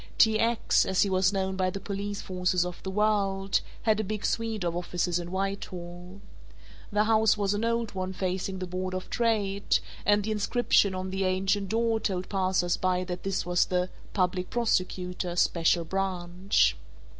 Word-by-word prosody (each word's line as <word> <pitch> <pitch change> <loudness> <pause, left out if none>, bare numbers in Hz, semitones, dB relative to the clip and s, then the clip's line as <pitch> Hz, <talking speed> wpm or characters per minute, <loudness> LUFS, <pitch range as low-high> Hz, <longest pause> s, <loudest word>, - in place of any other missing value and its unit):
"T. 220 -1 +5
X.," 230 0 +3
as 190 -1 +2
he 200 - -1
was 185 0 +3
known 190 -1 -1
by 185 -1 +1
the 195 - -5
police 200 +1 -4
forces 180 -1 0
of 180 -1 -6
the 190 - -5
world, 195 -1 +1 0.2
had 220 -1 +2
a - - +1
big 210 0 -3
suite 225 -3 -1
of 170 -1 -1
offices 175 0 -1
in 175 0 -6
Whitehall. 185 -1 -5 0.7
The 210 0 +3
house 220 -1 +3
was 200 -1 +1
an 205 +2 -2
old 230 -1 0
one 185 -1 -3
facing 190 0 -2
the 185 - -4
Board 185 +1 -4
of 185 - -6
Trade 205 -4 +1 0.3
and 205 0 +3
the 220 - -2
inscription 210 -2 +2
on 185 0 -4
the 190 0 -1
ancient 190 +1 0
door 225 0 +1
told 185 -4 -2
passers 185 -2 +1
by 185 0 0
that 180 -1 -5
this 195 -2 -2
was 175 0 +2
the 180 0 -1 0.2
"Public 180 -1 0
Prosecutor, 180 -6 -1
Special 170 -1 +2
Branch." 185 +1 +1
190 Hz, 175 wpm, -28 LUFS, 180-205 Hz, 0.7 s, T